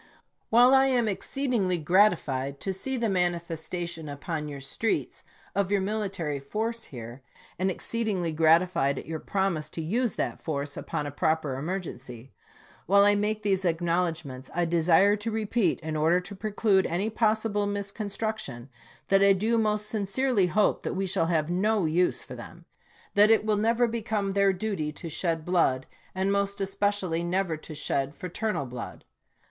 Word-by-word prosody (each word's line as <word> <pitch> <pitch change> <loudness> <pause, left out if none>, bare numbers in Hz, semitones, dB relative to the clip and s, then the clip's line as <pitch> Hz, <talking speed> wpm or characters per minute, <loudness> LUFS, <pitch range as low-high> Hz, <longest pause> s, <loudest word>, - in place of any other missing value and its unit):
While 245 +3 +6
I 270 0 +6
am 245 -4 +2
exceedingly 215 -3 0
gratified 150 -6 +2
to 195 - -2
see 265 +8 -3
the 235 -1 0
mani 180 -3 +1
festation 170 -1 -5
upon 150 +2 -4
your 145 -1 -7
streets 135 +11 -2 0.3
of 200 -2 0
your 200 - +3
military 190 -8 -2
force 220 +11 -3
here, 120 0 -9 0.4
and 190 +1 +1
exceedingly 195 -3 -1
gratified 160 -3 +3
at - - -6
your 160 0 -4
promise 190 -6 -1
to 165 - -7
use 230 +7 0
that - - -2
force 145 -2 -3
upon 150 - -4
a 145 - -4
proper 155 -1 0
emergency 135 -6 -6 0.3
— - - -26
while 200 +3 +6
I 205 - +5
make 210 +1 -1
these 195 -2 +1
acknowledgments 165 -6 -1
I 175 0 +2
desire 170 +4 +4
to 210 +2 -3
repeat, 220 -3 0
in 160 -1 -4
order 160 +4 +3
to 180 +3 -8
preclude 205 -1 +1
any 195 +6 -1
possible 215 -2 +1
misconstruction, 200 - -4 0.4
that 195 0 +5
I 200 0 +6
do 220 +4 +1
most 210 -1 0
sincerely 210 0 +1
hope 205 +4 +2
that - - -3
we 195 +1 -1
shall 175 -3 +1
have 165 -1 0
no 205 +1 +1
use 175 +3 +1
for - - -10
them; - - -11 0.5
that 205 +1 +6
it 225 -1 +4
will 215 -1 +2
never 230 +3 +2
become 220 -3 -2
their 200 0 +3
duty 190 -5 -2
to 165 +2 -7
shed 165 -1 -1
blood, 165 -8 +2 0.3
and 190 +1 +1
most 200 0 0
es 195 0 -2
pecially 195 -5 0
never 180 -1 0
to 155 0 -10
shed 140 -1 -1
fraternal 185 -3 -3
blood. 125 -2 -8
190 Hz, 165 wpm, -27 LUFS, 160-210 Hz, 0.5 s, While